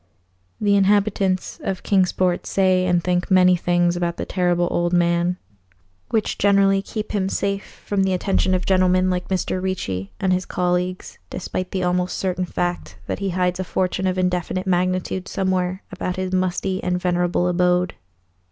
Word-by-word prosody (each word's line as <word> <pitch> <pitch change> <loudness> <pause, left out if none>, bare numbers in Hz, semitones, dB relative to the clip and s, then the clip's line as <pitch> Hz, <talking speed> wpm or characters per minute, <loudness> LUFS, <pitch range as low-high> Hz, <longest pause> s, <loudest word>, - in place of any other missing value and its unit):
The 205 -1 +3
inhabitants 195 -2 +1
of 190 -2 -3
Kingsport 185 -2 +1
say 185 -1 +2
and 175 -1 +2
think 180 0 0
many 185 -1 +5
things 175 0 +1
about 175 -1 -2
the - - -3
Terrible 175 -2 +1
Old 175 0 0
Man 175 +1 +2 0.7
which 220 -2 -1
generally 195 -1 +4
keep 215 +1 -5
him 195 -2 0
safe 200 0 -3
from 200 -1 0
the 190 0 +2
attention 185 0 +1
of 180 - -2
gentlemen 185 -1 +3
like 180 0 -2
Mr. 185 -1 -1
Ricci 95 - -3
and 185 -1 +2
his 185 0 -1
colleagues, 180 +1 -2
despite 185 0 -4
the 185 -1 -2
almost 180 0 0
certain 185 -1 -1
fact 90 - -3
that - - -3
he 195 -1 -1
hides 180 0 0
a - - 0
fortune 185 +1 -1
of 185 0 -1
indefinite 180 +1 -1
magnitude 185 0 0
somewhere 185 0 -1
about 185 -1 -3
his 185 0 -3
musty 185 +1 0
and 180 0 0
venerable 175 0 +1
abode. 180 0 +2
185 Hz, 160 wpm, -22 LUFS, 180-190 Hz, 0.7 s, many